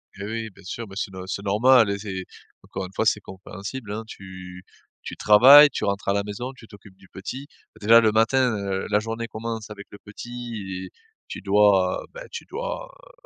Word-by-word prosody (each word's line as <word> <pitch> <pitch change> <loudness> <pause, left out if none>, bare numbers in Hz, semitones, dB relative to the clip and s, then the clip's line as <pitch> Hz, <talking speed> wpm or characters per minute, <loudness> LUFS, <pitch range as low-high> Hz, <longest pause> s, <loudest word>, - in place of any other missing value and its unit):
Hé 100 - -8
oui, 110 +1 -4
bien 100 0 -19
sûr. 115 +5 -6
Mais 95 - -12
c'est 100 -1 -3
no 95 0 -8
c'est 100 +1 -4
normal, 115 +2 +4
hein - - 0
et 100 - -5
c'est 95 -3 -5 0.4
encore 95 - -6
une 95 - -12
fois, 110 - -1
c'est 105 - +3
compréhensible, 100 +5 -8
hein. 110 +2 -4
Tu 95 -2 -11 0.4
tu - - -7
travailles, 135 +8 +8
tu - - -3
rentres 100 0 -2
à - - +3
la 100 0 0
maison, 115 +6 -6
tu 115 -4 -16
t'occupes 100 -1 -16
du 95 - -19
petit. 130 +10 -8 0.3
Bah, - - -17
déjà, 115 +1 +8
le 110 -1 +3
matin, 120 +3 +3
heu, 95 -1 -3
la 105 0 +3
journée 115 +1 -5
commence 110 -1 -6
avec 100 -1 -10
le 100 - -11
petit 105 -4 -7
et - - -11 0.4
tu - - -6
dois, 100 -2 +3
bah, - - -9
tu - - -6
dois, - - -5 0.2
heu, - - -17
105 Hz, 215 wpm, -24 LUFS, 95-115 Hz, 0.4 s, travailles